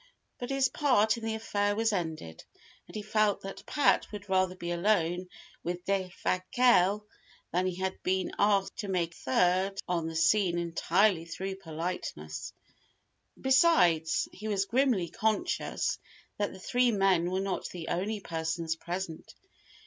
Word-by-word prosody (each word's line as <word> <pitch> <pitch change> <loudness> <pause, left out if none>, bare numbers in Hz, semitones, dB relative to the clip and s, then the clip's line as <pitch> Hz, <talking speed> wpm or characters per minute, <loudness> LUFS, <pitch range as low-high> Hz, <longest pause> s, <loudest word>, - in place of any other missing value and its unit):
But 245 - -5
his 275 -1 +2
part 235 -7 +3
in 230 - -9
the 225 0 -1
affair 205 -2 0
was 225 0 +1
ended, 160 - -4 0.4
and - - -13
he 210 - -4
felt 215 -1 +1
that 195 0 -8
Pat 290 - +2
would 205 -1 -8
rather 185 -1 +1
be 175 -1 -5
alone 180 -1 +1 0.3
with 175 +1 -4
Defasquelle; 195 +2 +2 0.5
that 180 +2 +1
he 185 - -2
had 190 +1 -3
been 185 0 0
asked 200 -1 +2
to 205 - -4
make 175 -3 -1
a - - -16
third 185 +8 +1
on 170 -2 -1
the 165 - -6
scene 175 +2 +3
entirely 170 +2 +2
through 190 +3 -5
politeness. 170 0 -5 0.9
Besides, 260 - +4
he 215 +3 -8
was 200 -2 +1
grimly 240 -7 +2
conscious 220 - -1 0.4
that 205 - 0
the - - -11
three 245 +6 +2
men 190 -4 +2
were 185 +1 -1
not 195 -1 -2
the 170 -3 -7
only 200 +4 -2
persons 160 -1 -2
present. 170 0 -6
190 Hz, 150 wpm, -30 LUFS, 175-215 Hz, 0.9 s, Besides